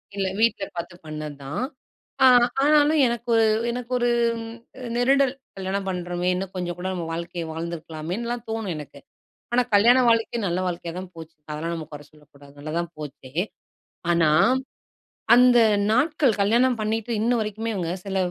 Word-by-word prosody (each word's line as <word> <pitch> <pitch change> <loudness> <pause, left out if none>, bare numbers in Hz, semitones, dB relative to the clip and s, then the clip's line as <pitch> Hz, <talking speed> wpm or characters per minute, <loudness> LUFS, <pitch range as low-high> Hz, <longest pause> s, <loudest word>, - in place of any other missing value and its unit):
இல்ல, 195 -1 -1
வீட்டுல 225 -3 +2
பார்த்து 175 +1 -5
பண்ணதுதான். 150 - -6 0.6
அ - - +9 0.4
ஆனாலும் 300 +1 +4
எனக்கு 235 0 -3
ஒரு, 225 - +5 0.3
எனக்கு 245 +1 -6
ஒரு 240 - +2 0.3
ம் 225 0 -7 0.4
நெருடல் 270 +1 +3 0.2
"கல்யாணம் 195 +1 -3
பண்ணுறோமே, 180 0 -2
இன்னும் 190 +1 -4
கொஞ்சம் 175 -1 -3
கூட 185 - -3
நம்ம 175 -2 -4
வாழ்க்கையை 170 0 -4
வாழ்ந்திருக்கலாமேன்னுலாம்" 170 +8 -5
தோணும் 220 -5 -3
எனக்கு. 145 -2 -9 0.5
ஆனா 250 - +4
கல்யாண 240 +5 +6
வாழ்க்கை 230 +1 +1
நல்ல 175 +1 -1
வாழ்க்கையா 170 -1 -4
தான் 185 - -8
போச்சு. 160 0 -11 0.2
அதெல்லாம் 165 +3 -3
நம்ம 160 -2 -6
குறை 145 0 -9
சொல்லக்கூடாது, 145 -2 -19
நல்லாதான் 165 +3 -3
போச்சு. 135 -3 -9 0.8
ஆனா 165 -2 +3 1.1
அந்த 250 -1 +6 0.3
நாட்கள் 275 -3 +2
கல்யாணம் 235 +3 +3
பண்ணிட்டு 225 +2 -2
இன்ன 235 - +2
வரைக்குமே 215 +1 -3
இவங்க 175 -2 -2
சில 195 0 -3
190 Hz, 145 wpm, -24 LUFS, 165-235 Hz, 1.1 s, அ